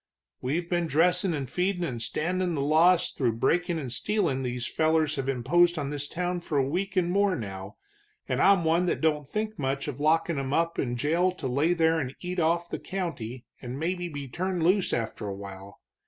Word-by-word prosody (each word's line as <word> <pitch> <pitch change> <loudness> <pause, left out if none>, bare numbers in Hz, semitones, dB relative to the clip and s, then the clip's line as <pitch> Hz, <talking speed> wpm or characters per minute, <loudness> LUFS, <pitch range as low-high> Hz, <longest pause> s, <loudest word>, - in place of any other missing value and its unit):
"We've 160 +7 -1
been 175 -1 0
dressin' 170 +4 +2
and 140 -3 -3
feedin' 180 +2 -1
and 125 -8 -3
standin' 175 +7 -1
the 140 - -1
loss 165 +5 +4
through 120 -4 0
breakin' 170 +9 +1
and 135 -6 -4
stealin' 170 - 0
these 125 -1 -3
fellers 160 -1 +2
have 135 0 -2
imposed 170 +7 +3
on 145 -2 -2
this 145 -1 -3
town 180 +2 -2
for 160 -3 -3
a 135 -1 +2
week 185 +6 -2
and 175 -1 +2
more 200 0 +2
now, 95 - -6 0.5
and - - 0
I'm 195 -3 +5
one 165 +3 +2
that - - 0
don't 150 -3 +1
think 215 +3 -3
much 135 +1 -1
of 145 -2 -5
lockin' 160 +2 +2
them 135 0 -2
up 165 +1 +1
in 120 -2 -1
jail 165 +8 +2
to 160 -7 -5
lay 145 +7 +2
there 165 -1 +3
and 135 -3 -4
eat 180 0 -4
off 170 +1 +2
of - - -27
the - - -3
county 130 - -5 0.2
and 125 +1 -6
maybe 175 +3 -2
be 145 -3 -6
turned 180 +5 -2
loose 185 +3 +3
after 115 -2 -2
a 100 - -4
while. 100 0 -10
160 Hz, 210 wpm, -27 LUFS, 135-175 Hz, 0.5 s, I'm